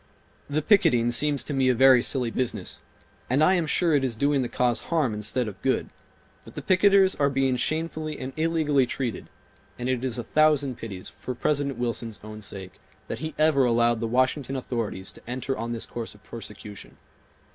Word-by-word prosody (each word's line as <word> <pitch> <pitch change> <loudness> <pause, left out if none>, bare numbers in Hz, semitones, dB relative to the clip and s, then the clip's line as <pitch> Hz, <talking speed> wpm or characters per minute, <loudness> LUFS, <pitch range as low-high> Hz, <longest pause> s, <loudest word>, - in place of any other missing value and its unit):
"The 150 +1 -1
picketing 125 - +4
seems 145 +3 +2
to 145 - -5
me 135 -1 +2
a 125 - +3
very 130 0 +6
silly 125 -2 +1
business, 115 -7 -3 0.5
and 135 +5 +3
I 180 - +5
am 175 -4 +1
sure 170 +1 +2
it 140 -2 +3
is 125 -4 -1
doing 140 +3 +1
the 120 - -2
cause 125 -1 +1
harm 155 -9 +1
instead 110 +3 -1
of 95 -2 -8
good; 135 - 0 0.5
but - - -14
the - - -6
picketers 195 0 +4
are 140 -1 +3
being 135 -1 +1
shamefully 155 +3 -2
and 130 +1 -6
illegally 155 -5 +1
treated, 125 -3 -4 0.5
and 125 - -4
it 130 -1 -1
is 125 -3 -1
a 120 - -3
thousand 145 -1 +2
pities, 95 -5 -7
for 125 - -5
President 140 0 0
Wilson's 115 -2 -3
own 110 0 -9
sake, 95 -2 -8 0.3
that - - -4
he 155 -1 -5
ever 155 -3 +4
allowed 120 -1 +3
the 115 - -2
Washington 130 +3 0
authorities 115 -7 -4
to - - -15
enter 130 +2 -3
on 115 0 -4
this 115 -1 -4
course 115 -3 -7
of 105 - -20
persecution. 105 0 -10
130 Hz, 190 wpm, -26 LUFS, 115-145 Hz, 0.5 s, very